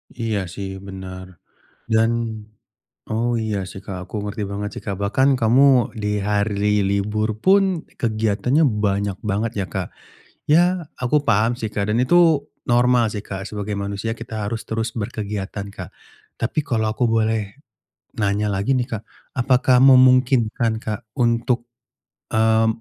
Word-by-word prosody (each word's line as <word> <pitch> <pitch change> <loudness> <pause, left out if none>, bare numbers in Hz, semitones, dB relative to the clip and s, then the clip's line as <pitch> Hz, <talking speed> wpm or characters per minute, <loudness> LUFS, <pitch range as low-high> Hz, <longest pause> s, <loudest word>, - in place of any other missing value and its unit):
Iya 115 -3 -1
sih 95 +3 -6 0.2
bener. 95 -1 -8 0.7
Dan 110 +1 +4 1.0
oh 115 +2 0
iya 110 -2 -2
sih, 95 - -9
Kak, 95 -2 -6
aku - - -16
ngerti 105 +1 -4
banget 105 +1 -3
sih, - - -10
Kak. 100 - -2
Bahkan 130 +7 +2
kamu 120 +5 +4 0.4
di 105 - -1 0.2
hari 105 0 0 0.2
libur 105 +2 0
pun 195 +1 +5 0.4
kegiatannya 115 +6 +1 0.2
banyak 100 -1 0
banget 110 +4 0
ya, 95 - -2
Kak. 95 -2 -2 0.6
Ya 155 - +7 0.4
aku 125 +3 +1
paham 110 +1 +3
sih, 110 - -2
Kak, 100 - -1
dan 110 - +1
itu 130 - +2 0.6
normal 120 0 +4
sih, 105 - -4
Kak, 95 -1 -5
sebagai 105 0 -4
manusia 100 +3 -3
kita 115 0 -9
harus 115 +2 -3
terus 115 +1 -1
berkegiatan, 100 -2 -4
Kak. 90 -3 -7 0.5
Tapi 115 +7 -1
kalau 110 -3 0
aku 125 - -1
boleh 110 0 +2 0.8
nanya 100 +1 +1
lagi 100 +7 -1
nih, 125 -1 -1
Kak, 105 - -3 0.4
apakah 125 0 +3
memungkinkan, 130 -3 +4
Kak, 110 +1 -3 0.2
untuk, 120 0 +2 0.8
eee, 110 0 +4
110 Hz, 140 wpm, -21 LUFS, 100-120 Hz, 1.0 s, Ya